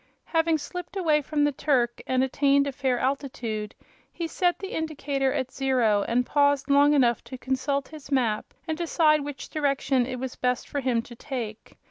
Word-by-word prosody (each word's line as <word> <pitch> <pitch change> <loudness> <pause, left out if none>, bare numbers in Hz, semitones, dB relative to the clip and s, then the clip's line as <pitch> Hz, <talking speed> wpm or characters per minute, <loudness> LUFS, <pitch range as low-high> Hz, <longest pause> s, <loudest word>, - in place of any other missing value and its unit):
Having 325 -1 +2
slipped 360 +5 -7
away 310 -5 +3
from 295 +1 0
the 290 - +3
Turk 255 -4 0
and 255 0 +2
attained 280 +1 +3
a 280 - -2
fair 265 -2 0
altitude, 245 -5 -3 0.4
he 340 - -4
set 355 +1 +1
the 385 - -7
indicator 285 -4 -1
at 260 0 -2
zero 245 -7 +2
and 245 +2 +1
paused 285 0 +2
long 285 +1 +5
enough 240 -5 +3
to 260 - -8
consult 265 +2 -1
his 300 -2 -11
map 235 -6 0 0.2
and 320 - -1
decide 315 -3 +3
what 290 -1 -6
direction 275 -4 +1
it 255 -1 -4
was 255 0 -5
best 250 -1 -1
for 285 - -3
him 245 -4 0
to 240 - -12
take. 230 -4 -6
275 Hz, 180 wpm, -26 LUFS, 250-295 Hz, 0.4 s, long